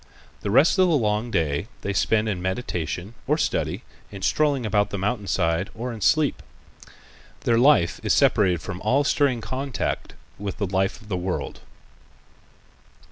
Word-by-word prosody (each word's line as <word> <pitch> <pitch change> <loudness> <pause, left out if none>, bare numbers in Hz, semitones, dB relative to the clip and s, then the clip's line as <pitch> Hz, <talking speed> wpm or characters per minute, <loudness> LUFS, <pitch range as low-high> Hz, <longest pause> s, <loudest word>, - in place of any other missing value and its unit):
The - - -3
rest 140 - +4
of 185 - +6
the 170 - +3
long 105 -1 0
day 80 -2 -1
they 100 - -2
spend 110 +2 +2
in 95 -4 -2
meditation, 90 -1 -3
or 150 +3 +2
study, - - -1 0.3
in 100 -2 -8
strolling 140 +2 +1
about 105 -1 +1
the 100 - -4
mountain 105 +1 -2
side 85 +1 0
or 120 +2 -4
in 110 - -9
sleep. 155 +7 +2 1.0
Their 115 -1 +2
life 120 - +4
is - - -1
separated 90 -6 +3
from 90 0 -6
all 130 +7 +2
stirring 140 -4 +1
contact 130 +1 -3 0.2
with 100 -1 -4
the 100 - -1
life 95 +1 -1
of - - -16
the 95 -3 -2
world. 90 0 -3
105 Hz, 160 wpm, -24 LUFS, 95-125 Hz, 1.0 s, of